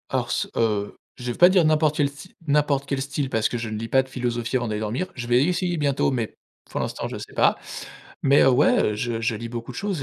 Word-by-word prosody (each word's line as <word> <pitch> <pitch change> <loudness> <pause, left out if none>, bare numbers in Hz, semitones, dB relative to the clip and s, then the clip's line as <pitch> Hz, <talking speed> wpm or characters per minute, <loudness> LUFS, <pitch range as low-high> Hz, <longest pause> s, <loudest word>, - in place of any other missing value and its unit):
Hors - - -1
ce, - - 0
heu, 105 -3 0 0.2
je 125 -1 -4
vais - - -7
pas 175 - +8
dire 185 -2 +4
n'importe 155 -1 +3
quel 145 -1 +2
sty 145 +6 -14
n'importe 145 -1 +2
quel 135 -1 -1
style, 140 0 -2
parce 110 -3 +1
que 120 - -3
je 115 -1 -4
ne 110 - -4
lis 115 +1 -4
pas 130 +3 +3
de 130 - -16
philosophie 120 -1 -1
avant 120 -1 -2
d'aller 105 -1 -2
dormir, 115 - -2
je 120 -2 -5
vais 120 +2 +4
essayer 175 +1 0
bientôt, 140 -2 +1
mais 120 -4 -3 0.3
pour - - -4
l'instant, - - -3
je - - -6
sais - - -9
pas. - - +3 0.7
Mais, 140 +1 +5
heu, 135 - +6
ouais, 125 -4 +3
je 115 +1 -2
je 115 0 0
lis 115 +2 -6
beaucoup 120 +1 -6
de - - -11
choses, 200 -4 -2
130 Hz, 255 wpm, -24 LUFS, 115-145 Hz, 0.7 s, pas